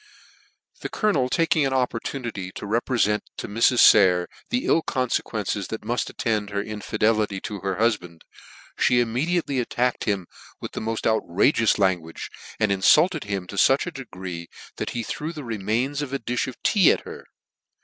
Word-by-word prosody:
The -, -, -5 dB
colonel 150 Hz, -, +1 dB
taking 165 Hz, 0 st, +2 dB
an 135 Hz, -1 st, 0 dB
opportunity 120 Hz, -5 st, -3 dB
to -, -, -7 dB
reprefent 110 Hz, -1 st, +1 dB, 0.2 s
to -, -, -5 dB
Mrs. 115 Hz, +4 st, +3 dB
Sayer 90 Hz, -3 st, +6 dB, 0.2 s
the 245 Hz, +1 st, -1 dB
ill 165 Hz, -, +3 dB
confequences 110 Hz, -, -2 dB
that 110 Hz, -, -5 dB
muft 120 Hz, +3 st, -2 dB
attend 105 Hz, -3 st, -1 dB
her 100 Hz, -1 st, -2 dB
infidelity 105 Hz, -1 st, 0 dB
to 105 Hz, -2 st, -5 dB
her 95 Hz, 0 st, -2 dB
hufband, 105 Hz, -7 st, -1 dB, 0.6 s
Ihe 125 Hz, -1 st, +4 dB
immediately 135 Hz, +5 st, 0 dB
at 120 Hz, -, -2 dB
tacked 125 Hz, 0 st, 0 dB
him 100 Hz, -4 st, -1 dB, 0.3 s
with -, -, -6 dB
the -, -, -5 dB
mod 115 Hz, 0 st, -3 dB
outrageous 110 Hz, -, +2 dB
language, 90 Hz, -5 st, -1 dB, 0.3 s
and 110 Hz, -2 st, +2 dB
inlulted 150 Hz, -, +4 dB
him 100 Hz, -3 st, -3 dB
to 100 Hz, -, -9 dB
that 135 Hz, -, +3 dB
degree 90 Hz, -, -7 dB, 0.3 s
chat -, -, -2 dB
he 120 Hz, -, -3 dB
threw 155 Hz, +7 st, -4 dB
the 150 Hz, -3 st, -7 dB
remains 115 Hz, +6 st, -1 dB
of 145 Hz, -3 st, -5 dB
a -, -, +1 dB
dilh 125 Hz, 0 st, -2 dB
of 130 Hz, -, -8 dB
tea 195 Hz, -5 st, +5 dB
ac -, -, +1 dB
her. -, -, -9 dB
115 Hz, 165 wpm, -24 LUFS, 100-130 Hz, 0.6 s, Sayer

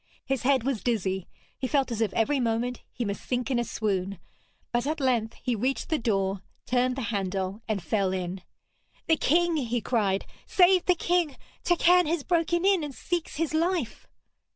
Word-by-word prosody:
His 270 Hz, -3 st, -1 dB
head 260 Hz, -2 st, +3 dB
was 265 Hz, -4 st, -1 dB
dizzy, 190 Hz, -6 st, -1 dB, 0.3 s
he 260 Hz, -, -1 dB
felt 275 Hz, -2 st, +1 dB
as 230 Hz, -1 st, -2 dB
if 215 Hz, -3 st, +1 dB
every 275 Hz, +5 st, +2 dB
moment 240 Hz, +1 st, -1 dB
he 240 Hz, -, -3 dB
must 200 Hz, -1 st, -4 dB
sink 250 Hz, +1 st, -2 dB
in 245 Hz, -, +2 dB
a -, -, +1 dB
swoon; 200 Hz, -4 st, -2 dB, 0.5 s
but 240 Hz, +3 st, 0 dB
at 310 Hz, +1 st, -1 dB
length 240 Hz, -5 st, +1 dB
he 250 Hz, -2 st, 0 dB
reached 255 Hz, +5 st, -1 dB
the 315 Hz, -2 st, +1 dB
door, 195 Hz, -4 st, 0 dB, 0.2 s
turned 250 Hz, 0 st, +1 dB
the 265 Hz, -, -3 dB
handle 195 Hz, +1 st, -2 dB
and 210 Hz, -5 st, -2 dB
fell 195 Hz, +2 st, +1 dB
in. 185 Hz, 0 st, -3 dB, 0.6 s
'The 320 Hz, -, +3 dB
king!' 340 Hz, +3 st, +2 dB
he 240 Hz, -4 st, -1 dB
cried. 205 Hz, -4 st, 0 dB, 0.2 s
'Save 365 Hz, -1 st, +5 dB
the 360 Hz, -, +4 dB
king! 345 Hz, -5 st, 0 dB, 0.3 s
Turquine 355 Hz, 0 st, +4 dB
has 325 Hz, -2 st, 0 dB
broken 345 Hz, +1 st, +1 dB
in 390 Hz, -4 st, +4 dB
and 290 Hz, -3 st, -6 dB
seeks 345 Hz, -1 st, -3 dB
his 320 Hz, 0 st, -1 dB
life.' 330 Hz, -6 st, -1 dB
250 Hz, 180 wpm, -27 LUFS, 215-315 Hz, 0.6 s, Save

